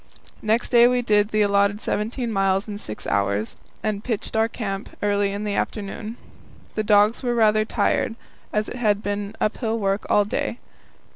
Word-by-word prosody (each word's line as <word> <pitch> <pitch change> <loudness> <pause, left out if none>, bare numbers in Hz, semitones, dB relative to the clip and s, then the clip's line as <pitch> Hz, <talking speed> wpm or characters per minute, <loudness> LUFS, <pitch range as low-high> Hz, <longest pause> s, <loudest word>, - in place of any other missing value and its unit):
Next 220 +3 +1
day 240 -1 +7
we 250 0 +1
did 210 -2 +3
the 215 -1 +2
allotted 200 0 +2
seventeen 230 +3 -2
miles 195 0 +1
in 205 -1 -5
six 110 - -7
hours, 100 +2 0 0.3
and 215 -1 -1
pitched 225 -2 -2
our 220 0 +3
camp 200 -4 -4
early 205 -1 +2
in 200 +1 -4
the 205 -1 -2
afternoon. 210 +3 -3 0.6
The 215 - -1
dogs 210 +1 +4
were 245 -2 0
rather 215 -1 +4
tired, 225 - 0 0.4
as 210 0 0
it - - -6
had 210 -4 +1
been 205 +1 -3
uphill 225 +1 0
work 195 -1 -1
all 205 -1 +4
day. 220 +3 -2
210 Hz, 170 wpm, -23 LUFS, 200-225 Hz, 0.6 s, day